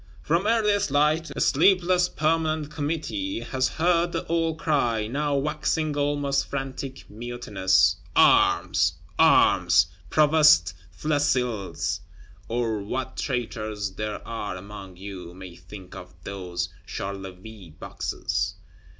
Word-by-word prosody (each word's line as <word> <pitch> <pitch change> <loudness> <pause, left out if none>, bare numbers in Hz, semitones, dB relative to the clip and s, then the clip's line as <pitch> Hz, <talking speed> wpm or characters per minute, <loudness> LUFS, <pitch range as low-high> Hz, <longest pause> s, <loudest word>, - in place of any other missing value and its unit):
From 170 +6 +1
earliest 210 -4 +2
light, 150 +3 +2
a - - -4
sleepless 180 +2 +3
Permanent 155 -1 0
Committee 165 - -3
has 130 -1 0
heard 170 +1 +1
the 165 - -3
old 165 -1 0
cry, 120 -9 +1
now 145 +5 -1
waxing 150 +1 -1
almost 145 -1 0
frantic, 135 -1 -5
mutinous: 105 -4 +1 0.2
Arms! - - +4 0.3
Arms! 90 0 +5 0.2
Provost 150 - +5 0.2
Flesselles, 125 - -1 0.5
or 115 -2 -1
what 125 +6 -4
traitors 110 -5 -3
there 105 +1 -5
are 105 -4 -4
among 95 -1 -10
you, 90 -3 -8
may 95 -2 -10
think 90 +2 -12
of 90 -1 -11
those 90 -3 -4 0.2
Charleville 95 0 -7
Boxes. - - -3
130 Hz, 105 wpm, -25 LUFS, 100-155 Hz, 0.5 s, Arms